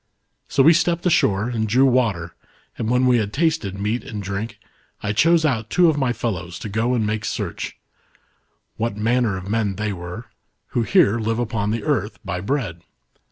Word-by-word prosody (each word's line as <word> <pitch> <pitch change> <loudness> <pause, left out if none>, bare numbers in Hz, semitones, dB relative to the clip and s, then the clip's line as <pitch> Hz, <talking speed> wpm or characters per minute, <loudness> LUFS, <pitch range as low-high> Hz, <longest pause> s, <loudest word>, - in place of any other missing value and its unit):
So 135 - +3
we 165 - +7
stepped 170 +1 +1
ashore 105 - +3
and 110 -3 -1
drew 125 +6 +4
water, 110 -11 +1 0.4
and 110 - -3
when 125 +1 +3
we 125 -1 +4
had 105 -2 -2
tasted 150 - 0
meat 105 +4 -1
and 105 -3 -6
driuk, 100 +4 -4 0.5
I 105 0 0
chose 165 +7 +4
out 115 -6 0
two 180 -2 +4
of 155 - 0
my 130 -3 +1
fellows 90 -8 -3
to 110 - -5
go 115 +5 0
and 110 -3 +1
make 105 0 -2
search, - - -4 1.0
what 115 -2 -2
manner 115 -2 +1
of 95 +1 -7
men 105 -2 0
they 105 0 -2
were, 90 +6 -7 0.4
who 120 - 0
here 120 - +3
live 115 +1 -1
upon 115 -3 -1
the 110 0 -2
earth, - - -1
by 90 +1 -3
bread. 100 - -2
115 Hz, 185 wpm, -22 LUFS, 100-125 Hz, 1.0 s, we